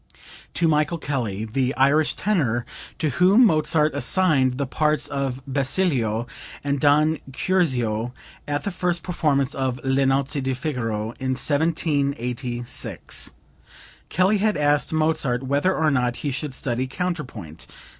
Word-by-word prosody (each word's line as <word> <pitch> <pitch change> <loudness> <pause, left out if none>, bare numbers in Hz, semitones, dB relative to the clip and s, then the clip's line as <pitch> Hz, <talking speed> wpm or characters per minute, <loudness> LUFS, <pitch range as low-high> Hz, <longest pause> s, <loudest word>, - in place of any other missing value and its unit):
(To 170 - +2
Michael 155 +1 +1
Kelly, 115 -9 -3
the 130 +4 -1
Irish 145 +3 +3
tenor, 135 - 0 0.3
to 155 -5 0
whom 190 - +5
Mozart 155 -4 +2
assigned 140 -5 +2
the 140 - -1
parts 150 +1 +1
of 135 -2 -3
Basilio 135 - 0 0.4
and 140 0 -1
Don 150 +2 +3
Curzio 125 -9 0 0.4
at 145 0 -2
the 200 - -2
first 175 -2 -1
performance 145 -6 0
of 130 -2 -2
"Le 135 0 +2
Nozze 135 +1 +1
di 130 0 -1
Figaro" 115 -6 -3
in 130 0 -1
1786. 140 -5 0 0.8
Kelly 190 +5 +2
had 215 +1 +1
asked 145 0 +2
Mozart 155 -5 0
whether 145 +8 +1
or 155 -1 +2
not 125 -3 +1
he 145 - 0
should 135 0 -4
study 125 0 -2
counterpoint. 130 - -5
140 Hz, 130 wpm, -23 LUFS, 130-155 Hz, 0.8 s, whom